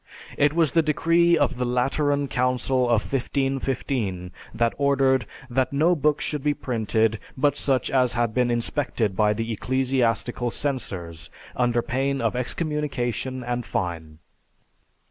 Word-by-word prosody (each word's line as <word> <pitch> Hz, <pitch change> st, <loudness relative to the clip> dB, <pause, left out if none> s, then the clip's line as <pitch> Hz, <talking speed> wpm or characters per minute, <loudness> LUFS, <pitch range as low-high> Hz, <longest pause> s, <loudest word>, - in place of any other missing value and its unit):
It 145 Hz, +1 st, +3 dB
was 160 Hz, -3 st, +2 dB
the 165 Hz, -, +4 dB
decree 165 Hz, +2 st, +3 dB
of 145 Hz, -4 st, +1 dB
the 125 Hz, -, -1 dB
Lateran 140 Hz, +4 st, +1 dB
Council 125 Hz, 0 st, +1 dB
of 120 Hz, -3 st, +2 dB
1515 130 Hz, -8 st, -1 dB, 0.2 s
that 115 Hz, -1 st, 0 dB
ordered 135 Hz, -4 st, +2 dB, 0.2 s
that 130 Hz, +1 st, 0 dB
no 160 Hz, +6 st, +3 dB
books 150 Hz, -1 st, +1 dB
should 150 Hz, -2 st, -3 dB
be 150 Hz, 0 st, +1 dB
printed 110 Hz, -2 st, 0 dB, 0.2 s
but 145 Hz, +1 st, +2 dB
such 135 Hz, -2 st, 0 dB
as 130 Hz, -2 st, +2 dB
had 120 Hz, -2 st, 0 dB
been 125 Hz, 0 st, +2 dB
inspected 120 Hz, -3 st, -1 dB
by 105 Hz, 0 st, +3 dB
the 115 Hz, +2 st, -3 dB
ecclesiastical 125 Hz, 0 st, 0 dB
censors, 95 Hz, -, -4 dB, 0.3 s
under 120 Hz, -1 st, +1 dB
pain 135 Hz, +2 st, -1 dB
of 115 Hz, -1 st, 0 dB
excommunication 130 Hz, -, -2 dB
and 120 Hz, 0 st, -2 dB
fine. 85 Hz, -7 st, -4 dB
125 Hz, 135 wpm, -24 LUFS, 115-140 Hz, 0.3 s, the